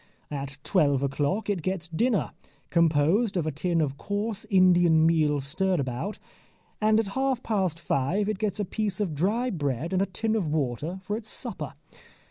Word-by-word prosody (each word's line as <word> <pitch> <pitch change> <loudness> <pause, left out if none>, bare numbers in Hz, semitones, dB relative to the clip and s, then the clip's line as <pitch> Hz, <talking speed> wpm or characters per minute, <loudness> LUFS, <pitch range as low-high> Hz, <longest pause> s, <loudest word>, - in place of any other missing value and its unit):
At 140 -1 -4
twelve 145 -8 +2
o'clock 145 +9 -1
it 200 -4 0
gets 180 0 -2
dinner, 215 +6 0 0.4
composed 170 +6 +3
of 165 - 0
a 155 - 0
tin 165 +3 0
of 140 -2 -1
coarse 205 +3 -3
Indian 175 -4 +5
meal 155 -3 +3
stirabout, 150 - -1 0.6
and 215 +1 +4
at 220 -3 -1
half 265 +2 0
past 190 -7 0
five 170 +6 0
it 215 -3 -2
gets 215 -1 -1
a 205 - 0
piece 205 0 -2
of 195 -7 -1
dry 215 - 0
bread 145 0 -2
and 185 - +2
a 195 - +1
tin 220 +4 -1
of 200 -7 0
water 150 +3 -2
for 205 +3 -2
its 220 -1 -7
supper. - - -5
180 Hz, 170 wpm, -27 LUFS, 150-205 Hz, 0.6 s, Indian